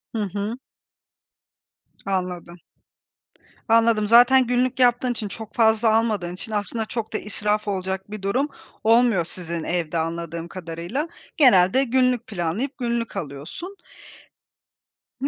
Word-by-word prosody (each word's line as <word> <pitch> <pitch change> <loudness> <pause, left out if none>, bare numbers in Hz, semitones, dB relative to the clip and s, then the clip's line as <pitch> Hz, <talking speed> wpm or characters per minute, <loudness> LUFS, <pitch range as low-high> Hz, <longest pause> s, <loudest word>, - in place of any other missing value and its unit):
Hı 220 - 0
hı. 205 +4 -3 1.5
Anladım. 180 -3 -3 1.1
Anladım. 225 -2 +4
Zaten 245 +3 +6
günlük 250 +1 0
yaptığın 245 0 +3
için, 220 -3 -4
çok 220 +2 -9
fazla 220 -1 +4
almadığın 210 -6 0
için 220 +5 -8
aslında 215 +2 -2
çok 220 0 -5
da - - +1
israf 210 0 -1
olacak 190 0 -3
bir 215 -1 -6
durum 245 +9 0 0.4
olmuyor 225 -5 +4
sizin 170 -1 -5
evde 170 -1 -2
anladığım 165 0 -3
kadarıyla. 175 - -5 0.3
Genelde 245 - +5
günlük 250 -1 +1
planlayıp 205 +8 -3
günlük 235 -4 -2
alıyorsun. 165 - -7 1.5
Hı, 275 - +1
215 Hz, 120 wpm, -23 LUFS, 180-240 Hz, 1.5 s, Zaten